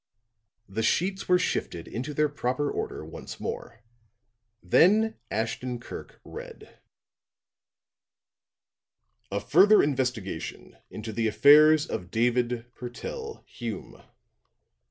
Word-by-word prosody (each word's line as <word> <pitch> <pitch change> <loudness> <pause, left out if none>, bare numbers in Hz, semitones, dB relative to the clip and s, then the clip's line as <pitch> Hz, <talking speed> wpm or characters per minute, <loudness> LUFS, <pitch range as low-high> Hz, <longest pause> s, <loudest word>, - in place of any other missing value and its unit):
The 100 +3 -3
sheets 190 - 0
were 180 - +6
shifted 85 - -2
into 130 +6 -5
their 150 +1 +3
proper 145 0 -2
order - - -4
once - - -9
more. 110 -2 -6 0.8
Then 210 - +4
Ashton 120 +3 -2
Kirk - - -10
read: - - -11 2.5
"'A 100 - 0
Further 185 - +6
Investigation 125 -8 -3
into 110 +1 -6
the 115 +1 0
Affairs 150 +6 +6
of 90 - -5
David 120 +1 0
Purtell 445 - -7
Hume. - - -7
125 Hz, 95 wpm, -27 LUFS, 115-155 Hz, 2.5 s, were